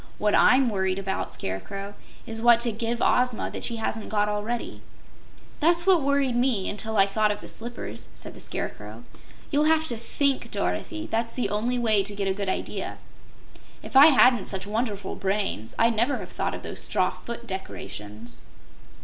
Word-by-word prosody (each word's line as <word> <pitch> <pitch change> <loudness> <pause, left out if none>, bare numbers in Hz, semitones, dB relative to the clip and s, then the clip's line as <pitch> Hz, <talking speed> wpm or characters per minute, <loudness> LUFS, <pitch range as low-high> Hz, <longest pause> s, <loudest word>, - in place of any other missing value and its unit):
"What 210 0 +1
I'M 260 +1 +5
worried 190 -2 0
about, 195 -1 -3
Scarecrow, 195 - -5 0.3
is 225 -2 -5
what 235 0 +6
to 235 -1 +1
give 230 +2 -2
Ozma 250 -2 +2
that - - -6
she 235 - -1
hasn't 225 -1 -3
got 210 -1 +1
already." 210 +3 -3 0.8
"That's 340 +2 +3
what 375 -4 +5
worried 280 -2 +1
me, 240 -6 +1
until 220 +1 -1
I 195 - +7
thought 210 +2 +1
of 210 - -2
the - - -10
slippers," 235 +1 -6
said - - -8
the - - -13
Scarecrow. - - -6 0.5
"You'll 295 0 +3
have 315 0 +3
to 240 - +1
THINK, 275 +4 0
Dorothy; 320 -1 -3
that's 230 +1 -1
the 220 -6 -1
only 235 +4 0
way 220 -4 +3
to 205 +1 -3
get 200 -1 -2
a 190 - +1
good 200 0 -3
idea. - - -3 0.9
If - - -10
I 275 +3 +10
hadn't 250 -7 +5
such 195 -1 -4
wonderful 205 -2 -2
brains, 195 - -2
I'd 230 0 +3
never 240 +6 +2
have - - -8
thought - - -2
of - - -9
those - - -6
straw - - +1
foot 235 0 -8
decorations." 120 - -8
225 Hz, 180 wpm, -26 LUFS, 200-250 Hz, 0.9 s, I